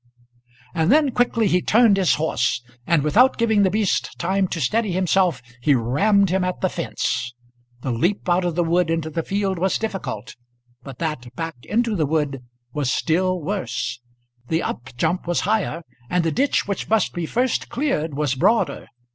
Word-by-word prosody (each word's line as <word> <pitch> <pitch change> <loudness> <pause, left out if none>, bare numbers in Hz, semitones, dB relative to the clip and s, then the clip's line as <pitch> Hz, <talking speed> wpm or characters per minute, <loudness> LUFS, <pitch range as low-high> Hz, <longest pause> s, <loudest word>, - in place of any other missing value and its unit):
And 160 +2 +2
then 295 -1 +4
quickly 240 -2 +1
he 180 -2 +2
turned 225 0 +4
his 185 -5 +3
horse, 125 -6 0 0.2
and 165 -4 +3
without 245 - +4
giving 220 -3 +3
the 195 - +4
beast 185 - 0
time 190 +2 0
to 170 - -4
steady 215 +4 0
himself 180 -6 +1 0.2
he 140 +2 +4
rammed 175 - +2
him 190 0 +1
at 180 0 -2
the 185 - +1
fence. 125 -7 -3 0.5
The 130 - -2
leap 175 - 0
out 180 +1 +2
of 175 -2 -1
the 175 - +2
wood 170 +1 +1
into 165 -1 -1
the 165 - -1
field 195 0 -1
was 190 +2 +1
difficult, 130 - -5 0.5
but 135 -3 -10
that 130 -7 -4
back 165 +2 -4
into 230 0 0
the 155 -6 +1
wood 145 -3 -1 0.3
was 145 -4 -1
still 185 +3 +1
worse. 190 -8 -3 0.5
The 165 +4 0
up 120 +3 -5
jump 170 +5 0
was 175 - +1
higher, 195 -5 -1 0.3
and 180 -1 +1
the 165 - 0
ditch 275 - +1
which 200 - -3
must 220 -3 +2
be 170 -2 -3
first 250 +5 0
cleared 235 - -1
was 145 -2 0
broader. 220 - +1
175 Hz, 180 wpm, -22 LUFS, 150-205 Hz, 0.5 s, then